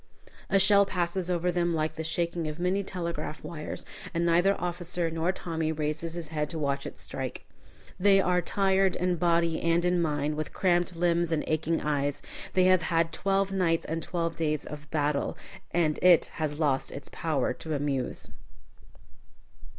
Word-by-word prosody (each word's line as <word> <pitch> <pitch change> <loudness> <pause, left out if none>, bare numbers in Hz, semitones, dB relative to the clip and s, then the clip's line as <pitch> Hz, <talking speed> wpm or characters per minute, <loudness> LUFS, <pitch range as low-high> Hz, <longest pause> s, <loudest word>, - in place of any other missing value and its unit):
A 195 - +4
shell 200 +1 +6
passes 180 -1 -2
over 180 0 +1
them 175 -1 +1
like 155 0 -1
the 160 - -5
shaking 170 0 -1
of 155 0 -5
many 185 +3 0
telegraph 170 -5 -4
wires, 155 -3 -6 0.3
and 170 0 +1
neither 175 +4 +3
officer 175 -1 -1
nor 165 +2 0
Tommy 165 -4 -2
raises 155 +2 -3
his 165 -3 -5
head 150 -2 -2
to 160 - -5
watch 140 -2 -1
it - - -9
strike. - - -5 0.5
They 195 +1 +5
are 180 -1 +2
tired 195 +1 +2
in 180 -1 0
body 170 -1 +2
and 170 +1 +2
in 180 0 +2
mind, 150 -1 -1
with 155 - -4
cramped 175 -1 +1
limbs 170 0 +1
and 160 -2 +1
aching 160 +1 0
eyes. 145 -1 -1 0.3
They 185 - +4
have 185 -1 +5
had 165 0 +1
twelve 195 0 +1
nights 175 -4 +1
and 165 +1 -3
twelve 165 -1 -2
days 155 -2 -1
of 150 -1 -9
battle, 145 -2 0 0.3
and 160 -3 +1
it 180 -2 +6 0.2
has 150 -1 -1
lost 140 -4 +1
its 140 0 -8
power 160 -3 -1
to 160 -1 -5
amuse. 140 -3 -2
170 Hz, 170 wpm, -28 LUFS, 155-180 Hz, 0.5 s, shell